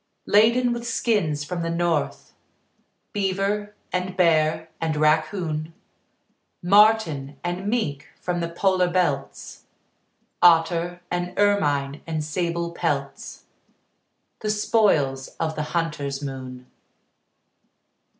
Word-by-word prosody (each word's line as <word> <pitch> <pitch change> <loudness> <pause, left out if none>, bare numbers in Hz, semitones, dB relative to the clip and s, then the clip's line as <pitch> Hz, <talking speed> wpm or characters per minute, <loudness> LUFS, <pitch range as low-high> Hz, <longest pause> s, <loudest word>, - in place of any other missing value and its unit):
Laden 235 +4 +4
with 235 0 -5
skins 205 -11 0
from 170 +4 -4
the 165 - -2
north, 170 -2 -1 0.8
Beaver 205 +1 -1 0.2
and 180 0 -2
bear 160 -2 +2
and 160 -1 0
raccoon, 155 +1 0 0.9
Marten 180 -8 +3
and 175 +3 -3
mink 155 - -1
from 180 -1 -2
the 170 -1 -2
polar 185 +1 +1
belts, 170 -7 -2 0.8
Otter 170 +1 +3
and 180 0 -3
ermine 145 -9 +1
and 160 -2 -2
sable 170 +2 -2
pelts 170 - -3 1.0
The 215 - -3
spoils 195 -11 +2
of 160 -1 -1
the 150 - -2
hunter's 150 -5 -2
moon. 130 -3 -7
170 Hz, 100 wpm, -24 LUFS, 155-195 Hz, 1.0 s, Laden